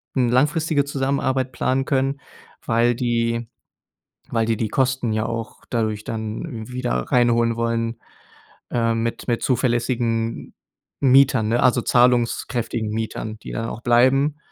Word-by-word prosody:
langfristige 145 +4 +2
Zusammenarbeit 135 -2 -1
planen 130 +2 0
können, 135 0 0 0.4
weil 120 +1 +2
die 115 -1 -1 0.8
weil 115 -1 +1
die 115 -1 +1
die 110 - -1
Kosten 130 -2 0
ja 110 0 0
auch 115 -1 -5
dadurch 110 -3 -1
dann 110 +2 -5
wieder 125 - -3 0.2
reinholen 120 -1 +3
wollen, 115 0 -1 0.7
äh, 115 -1 +1
mit 115 0 -3
mit 120 -2 0
zuverlässigen 120 -2 -1 0.5
Mietern, 130 -4 +4
ne, 120 +1 +2
also 125 -1 +4
zahlungskräftigen 120 -2 +1
Mietern, 110 0 -4
die - - -9
dann 115 0 -3
auch 115 - -7
bleiben, 130 +5 +3
120 Hz, 125 wpm, -22 LUFS, 115-130 Hz, 0.8 s, Mietern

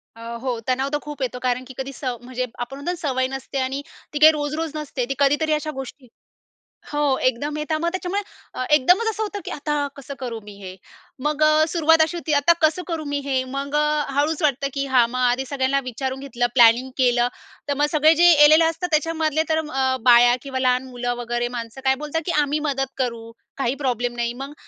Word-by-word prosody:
अ, 230 - -13 0.2
हो. 250 -3 -2
तणाव 260 +2 0
तर - - +3
खूप 295 -1 -8
येतो. 250 -1 -2
कारण 250 0 -1
की 260 - -10
कधी 265 +1 -4
सव 255 -3 -4
म्हणजे 255 +1 -4
आपण 245 +2 -5
म्हणतो 285 +5 -3
ना - - -3
सवय 260 -1 0
नसते 270 +1 -6
आणि 265 +2 -2 0.3
ती 295 - -2
काही 310 +1 +9
रोज-रोज 305 +1 -3
नसते, 295 -5 -3
ती - - 0
कधीतरी 290 +3 +2
अशा 305 0 -2
गोष्टी. 265 0 -11 0.8
हो, 295 -2 +1
एकदम 260 +4 -1
येत, 300 +1 -4
मग 340 - +1
त्याच्यामुळे 370 +2 -2 0.3
अ, - - -3
एकदमच 360 - +4
असं 440 0 -3
होतं 415 -1 -4
की, - - -5
"आता 295 0 -2 0.2
कसं 280 0 -8
करू 240 -3 -5
मी 205 0 -11
हे?" 185 -2 -9 0.5
मग 300 0 -1
अ, 310 0 +5
सुरुवात 325 -1 +3
अशी 320 +2 +1
होती, 320 -2 -2
"आता 300 +4 +4
कसं 315 +3 +2
करू 325 -3 -4
मी 285 - 0
हे?" 265 -2 0
मग 280 +1 -3
अ, 300 0 +2
हळूच 300 +3 +1
वाटतं 280 -2 +1
की 275 -1 -2
हां, 255 -3 +4
मग 255 +1 -4
आधी 250 +1 +1
सगळ्यांना 275 0 +1
विचारून 260 +2 -4
घेतलं, 250 -3 -1
प्लॅनिंग 240 +1 +5
केलं, 245 -2 +3 0.4
तर - - +2
मग 295 - +3
सगळे 310 +1 +5
जे 350 0 +8
आलेले 310 +2 +7
असतात 330 +2 -2
त्याच्यामधले, 315 0 +1
तर 315 0 +2
अ, 265 -2 +1
बाया 240 0 +6
किंवा 265 -1 -4
लहान 255 0 +2
मुलं 245 -1 -3
वगैरे 240 0 -2
माणसं 230 +3 -7
काय 265 0 +4
बोलतात 325 +2 -2
की, 350 - -1
"आम्ही 295 +1 0
मदत 270 -1 -2
करू, 235 -3 -3 0.3
काही 270 -1 0
प्रॉब्लेम 245 -2 -1
नाही." 235 0 -2
मग 280 - -8
275 Hz, 215 wpm, -22 LUFS, 255-305 Hz, 0.8 s, काही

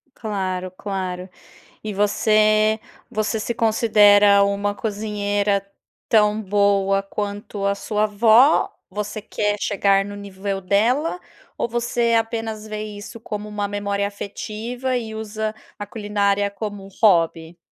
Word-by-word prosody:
Claro, 185 -4 -3
claro! 185 -1 -5 0.5
E 215 -1 -4
você 215 +1 +3 0.3
você 215 +1 -1
se 230 +2 -2
considera 205 -3 +5
uma 200 0 0
cozinheira 205 -2 -1 0.4
tão 210 -1 +3
boa 200 -1 +2
quanto 205 0 -5
a 200 - +2
sua 210 +1 -1
avó? 220 +6 +5 0.2
Você 210 +2 -4
quer 210 0 -1
chegar 195 -1 +2
no 205 +1 -7
nível 200 -1 -4
dela 235 - +1 0.4
ou - - 0
você 235 0 0
apenas 225 -1 -3
vê 215 0 -4
isso 210 +2 -8
como 210 -1 -5
uma 205 -1 -3
memória 200 0 -2
afetiva 225 +5 -4
e 220 -2 -5
usa 220 0 -4 0.2
a 205 - -4
culinária 205 -1 0
como 205 -1 -6
um - - -12
hobby? 165 -4 +3
205 Hz, 125 wpm, -22 LUFS, 200-220 Hz, 0.5 s, considera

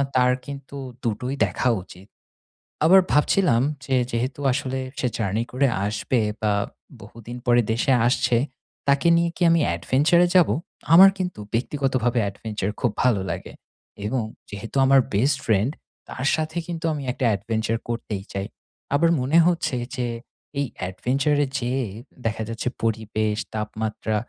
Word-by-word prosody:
তার 125 0 +4
কিন্তু 140 0 -8 0.3
২ 115 - +2
টোই 130 +2 -3
দেখা 130 - 0
উচিৎ। 95 +1 -14 0.8
আবার 190 +4 +8
ভাবছিলাম 150 -4 +3 0.2
যে 130 - +1 0.2
যেহেতু 125 +4 -2
আসলে 130 0 -2 0.2
সে 125 - +1
জার্নি 110 +1 0
করে 135 +2 +2 0.2
আসবে, 110 +4 0 0.2
বা 105 -1 +2 0.5
বহুদিন 115 +4 -10
পরে 120 0 +5
দেশে 120 +4 +2
আসছে। 120 -1 +2 0.5
তাকে 140 +4 +3
নিয়ে 170 0 +2
কি - - -15
আমি 165 -1 +4
adventure 140 - +3
এ - - +1
যাবো? 180 -3 +5 0.4
আমার 190 +3 +10
কিন্তু 180 - -3
ব্যক্তিগতভাবে 130 -1 0
adventure 105 0 -4
খুব 120 - +2
ভালো 120 -6 +3
লাগে। - - -6 0.5
এবং 115 +1 0 0.3
যেহেতু 105 +4 -8
আমার 135 0 +6
বেস্ট 130 +7 +2
ফ্রেন্ড, 110 +5 +2 0.4
তার 130 - -5
সাথে 160 +1 -3
কিন্তু 165 -1 -4
আমি 145 - -4
একটা 130 - -2
adventure 110 +2 -2
করতেই 105 -4 -3
চাই। 100 0 -3 0.5
আবার 165 +3 +4
মনে 140 +6 +2
হচ্ছে 170 -6 0 0.2
যে 125 -1 -1 0.5
এই 140 - 0 0.2
adventure 135 +9 0
এ - - -6
যেয়ে 125 +1 -1 0.4
দেখা 110 0 -1
যাচ্ছে 115 +2 -4 0.2
পরিবেশ, 110 -1 -1 0.2
তাপমাত্রা 110 0 -3
125 Hz, 145 wpm, -23 LUFS, 110-140 Hz, 0.8 s, আমার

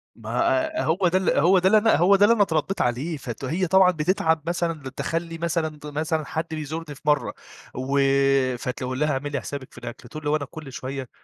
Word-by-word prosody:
ما - - -10 0.5
ه - - -1
هو 175 +3 +2
ده 185 +2 +2
ال 190 - +1
هو 180 +4 +5
ده 185 - +2
اللي 225 +1 +3
هو 180 +4 +5
ده 200 +1 +6
اللي 230 - +5
أنا 205 - +4
اتربيت 165 +1 -1
عليه، 140 +7 -1
فت 130 -1 -6
هي 175 +6 -1
طبعًا 190 0 +5
بتتعب 160 -1 +1
مثلًا، 170 -2 -1
بتدخل 145 +4 -3
لي 165 -1 -8
مثلًا 160 -2 -2
مثلًا 155 +1 -2
حد 160 +2 -3
بيزورني 155 0 -5
في - - -17
مرة 150 -1 +1 0.4
و 135 +2 0 0.6
فتقول 125 +2 -4
لها: 150 0 +2
"اعملي 140 +1 -3
حسابِك 140 -2 -7
في - - -18
الأكل." 120 0 -9
تقول 155 0 -8
لي: 145 - -1
"هو 150 - +3
أنا 145 -2 -2
كل 150 0 -10
شوية." 135 -2 -5
155 Hz, 215 wpm, -24 LUFS, 140-170 Hz, 0.6 s, ده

